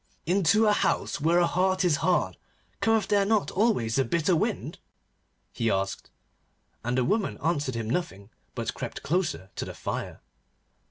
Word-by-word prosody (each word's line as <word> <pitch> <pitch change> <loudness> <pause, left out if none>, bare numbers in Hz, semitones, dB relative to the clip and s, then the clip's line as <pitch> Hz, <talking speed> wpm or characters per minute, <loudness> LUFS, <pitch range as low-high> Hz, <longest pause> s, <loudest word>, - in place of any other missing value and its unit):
'Into 195 +5 +3
a 210 - +4
house 180 - 0
where 165 +3 +3
a 175 - +5
heart 185 +2 +1
is 160 -5 +3
hard 180 -1 +1 0.4
cometh 225 -3 +2
there 200 -1 +3
not 215 0 +1
always 180 - +1
a - - +4
bitter 170 +4 +1
wind?' - - -2 0.7
he 115 - 0
asked. 95 -1 -2 0.7
And 120 +2 -1
the 125 - +2
woman 210 +1 0
answered 145 -6 -1
him 115 -1 -3
nothing, 110 - -3 0.2
but - - -3
crept - - -6
closer 160 - -1
to - - -3
the - - -7
fire. - - -5
175 Hz, 160 wpm, -27 LUFS, 125-195 Hz, 0.7 s, a